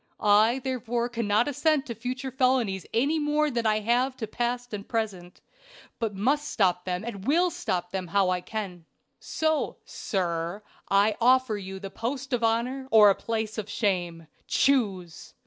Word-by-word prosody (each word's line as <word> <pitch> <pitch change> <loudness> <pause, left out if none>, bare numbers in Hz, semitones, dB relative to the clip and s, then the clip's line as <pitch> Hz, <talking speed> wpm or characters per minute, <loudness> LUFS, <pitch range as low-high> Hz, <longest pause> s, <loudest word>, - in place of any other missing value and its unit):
I 215 +4 +4
therefore 240 -2 -2
cannot 230 -1 +1
assent 295 0 +1
to 235 - -5
future 250 +4 -5
felonies 250 -7 +1
any 285 +7 +1
more 300 0 +1
than 235 -2 0
I 215 0 +2
have 250 +4 +1
to 225 - -3
past 240 +2 -3
and 200 -1 -6
present, 200 -6 -3 0.6
but 220 -4 -2
must 280 +9 +1
stop 180 -7 +1
them, 180 +1 -2
and 205 -4 -6
will 345 +5 +3
stop 180 - -3
them 185 -2 -3
how 190 +1 +2
I 180 0 -1
can. 185 -5 -6 0.3
"So, 315 -1 -1
sir, 175 0 -3 0.3
I 205 +2 +3
offer 255 -1 +4
you 190 -1 -6
the 195 0 -7
post 260 +5 -4
of 240 -1 0
honor 245 +4 0
or 210 -3 +7
a - - 0
place 220 -1 -3
of 210 -1 -6
shame. 175 -6 -1 0.2
Choose! 200 -11 0
225 Hz, 165 wpm, -27 LUFS, 195-255 Hz, 0.6 s, or